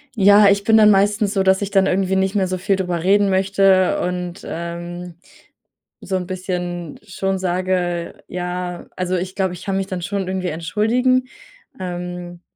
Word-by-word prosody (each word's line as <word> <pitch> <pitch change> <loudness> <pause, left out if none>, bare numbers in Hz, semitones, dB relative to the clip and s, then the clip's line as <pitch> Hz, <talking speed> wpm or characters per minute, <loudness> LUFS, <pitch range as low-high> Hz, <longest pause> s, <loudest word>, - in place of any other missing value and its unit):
Ja, 200 0 +6
ich 200 0 +2
bin 220 +1 +4
dann 210 -1 +7
meistens 205 +1 +2
so, 195 -1 +1
dass 190 +1 +3
ich 200 - -2
dann 195 -1 +3
irgendwie 190 0 +1
nicht 190 +1 +1
mehr 190 -3 +1
so 185 0 -2
viel 195 +2 +1
drüber 180 -3 -2
reden 200 +1 +3
möchte 190 0 +3
und, 180 0 -4
ähm, 170 +1 -6 0.9
so 190 -1 -2
'n 180 -1 -5
bisschen 180 -3 -4
schon 195 0 -2
sage, 180 -1 -1
ja 180 0 -5
also, 185 0 -1
ich 185 +1 -3
glaube, 190 -3 0
ich 175 - -9
kann 195 -1 -1
mich 195 0 -2
dann 185 -3 -4
schon 195 0 -3
irgendwie 185 -1 -2
entschuldigen, 240 +10 +1 0.5
ähm, 175 -1 -6
185 Hz, 170 wpm, -20 LUFS, 180-195 Hz, 0.9 s, dann